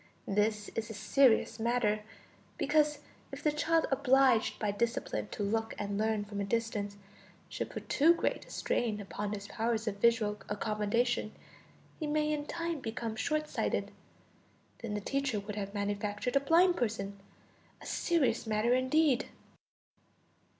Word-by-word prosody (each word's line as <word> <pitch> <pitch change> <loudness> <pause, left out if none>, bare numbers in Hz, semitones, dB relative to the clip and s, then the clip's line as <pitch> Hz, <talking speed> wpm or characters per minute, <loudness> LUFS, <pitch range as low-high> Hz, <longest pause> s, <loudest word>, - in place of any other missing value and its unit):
This 210 +1 +1
is 225 0 -4
a 220 - -6
serious 225 +1 +3
matter, 220 -2 +1 0.6
because 300 -1 +2 0.3
if - - -8
the 300 - +3
child, 320 +2 +2
obliged 265 -3 +4
by 210 -2 0
discipline 230 0 -2
to 205 - -4
look 225 +2 -1
and 205 -1 -3
learn 215 0 0
from 205 -1 -4
a - - 0
distance, 205 -1 -2 0.5
should - - -4
put - - -7
too 325 +4 +5
great - - -2
a - - -16
strain 240 - -1
upon 205 0 -4
his 200 -1 -6
powers 225 0 -1
of 200 -2 -1
visual 215 -1 +2
accommodation, 215 +2 0 0.7
he 310 - -2
may 305 0 +1
in 295 0 -3
time 335 -2 -3
become 230 -2 -4
short 305 +6 -1
sighted; - - -1 0.9
then 220 -3 -4
the 210 - -2
teacher 275 -1 -1
would 200 +1 -6
have 200 0 -5
manufactured 205 +4 -2
a - - +6
blind 340 +5 +4
person. 200 -4 -2 0.6
A - - -13
serious 330 -9 +1
matter 220 +2 +2
indeed! 260 +1 +3
225 Hz, 150 wpm, -32 LUFS, 210-275 Hz, 0.9 s, a